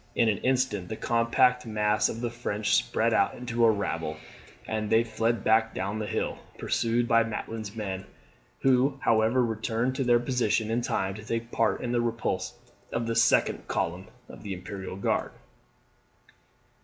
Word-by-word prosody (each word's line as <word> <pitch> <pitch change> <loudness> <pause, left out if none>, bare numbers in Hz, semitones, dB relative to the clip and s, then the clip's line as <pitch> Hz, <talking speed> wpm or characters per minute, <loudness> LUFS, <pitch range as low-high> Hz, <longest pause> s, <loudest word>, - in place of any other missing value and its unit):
In 115 - +3
an 105 - 0
instant 125 -8 0
the 110 - -3
compact 115 +2 +2
mass 105 -1 +2
of 115 - -5
the 120 -1 -2
French 110 -3 -2
spread 115 -1 +2
out 100 - +2
into 120 -1 -1
a 115 - +7
rabble, 85 -7 -1 0.5
and 110 -1 -2
they 115 +1 +4
fled 115 -1 -1
back 110 0 +3
down 100 +3 -2
the 105 - -3
hill, - - -2 0.2
pursued 120 +1 0
by 115 -1 +5
Maitland's 110 -1 -4
men, 95 -3 -4 0.5
who, 135 +1 +3
however, 115 +3 +3
returned 115 +2 -1
to 135 - +1
their 120 -1 +4
position 120 -3 0
in 120 +2 +1
time 95 -4 -1
to 105 +1 -9
take 115 +2 -3
part 115 - +1
in 120 - -2
the 120 -1 +2
repulse 115 -1 -2 0.3
of 120 0 -1
the 115 0 -2
second - - +3
column 90 +4 -2 0.2
of - - -12
the 100 -2 -5
Imperial 95 +1 -7
Guard. 100 - -1
115 Hz, 165 wpm, -28 LUFS, 105-120 Hz, 0.5 s, a